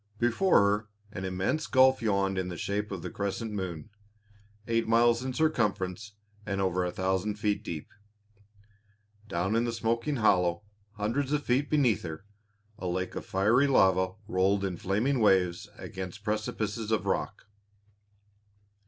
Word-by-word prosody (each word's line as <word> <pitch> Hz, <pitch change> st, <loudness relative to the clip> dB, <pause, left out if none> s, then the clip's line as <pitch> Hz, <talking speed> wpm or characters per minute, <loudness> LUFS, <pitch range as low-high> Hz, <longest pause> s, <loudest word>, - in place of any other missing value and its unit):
Before 120 Hz, -, +3 dB
her 105 Hz, +1 st, +1 dB, 0.2 s
an 95 Hz, -2 st, -5 dB
immense 95 Hz, +12 st, -1 dB
gulf 130 Hz, -1 st, +5 dB
yawned 100 Hz, -3 st, +1 dB
in 90 Hz, -, -2 dB
the 90 Hz, -2 st, -6 dB
shape 105 Hz, +3 st, -2 dB
of 95 Hz, -4 st, -5 dB
the 90 Hz, -, -5 dB
crescent 100 Hz, +3 st, -3 dB
moon, 95 Hz, -2 st, -5 dB, 0.8 s
eight 115 Hz, -1 st, +1 dB
miles 115 Hz, +1 st, +4 dB
in 130 Hz, -, -2 dB
circumference 105 Hz, -, -1 dB, 0.3 s
and 100 Hz, -2 st, -3 dB
over 90 Hz, -1 st, +1 dB
a 90 Hz, -, -1 dB
thousand 95 Hz, +3 st, -1 dB
feet 105 Hz, -1 st, -1 dB
deep. 80 Hz, -3 st, -6 dB, 1.4 s
Down 95 Hz, +2 st, -1 dB
in 115 Hz, -, +2 dB
the 120 Hz, -, -1 dB
smoking 115 Hz, +5 st, -1 dB
hollow, 90 Hz, -6 st, +2 dB, 0.3 s
hundreds 115 Hz, +7 st, -1 dB
of 150 Hz, -1 st, 0 dB
feet 130 Hz, +4 st, +1 dB
beneath 135 Hz, -8 st, +2 dB
her, 80 Hz, +2 st, -7 dB, 0.5 s
a 90 Hz, -, -4 dB
lake 90 Hz, +1 st, -2 dB
of -, -, -6 dB
fiery 110 Hz, +9 st, +3 dB
lava 95 Hz, -7 st, +3 dB
rolled 100 Hz, 0 st, +1 dB
in 95 Hz, -2 st, -2 dB
flaming 110 Hz, +7 st, 0 dB
waves 95 Hz, -5 st, +2 dB
against 95 Hz, +2 st, -7 dB
precipices 110 Hz, 0 st, -2 dB
of 110 Hz, -, +1 dB
rock. -, -, -2 dB
105 Hz, 145 wpm, -29 LUFS, 95-115 Hz, 1.4 s, gulf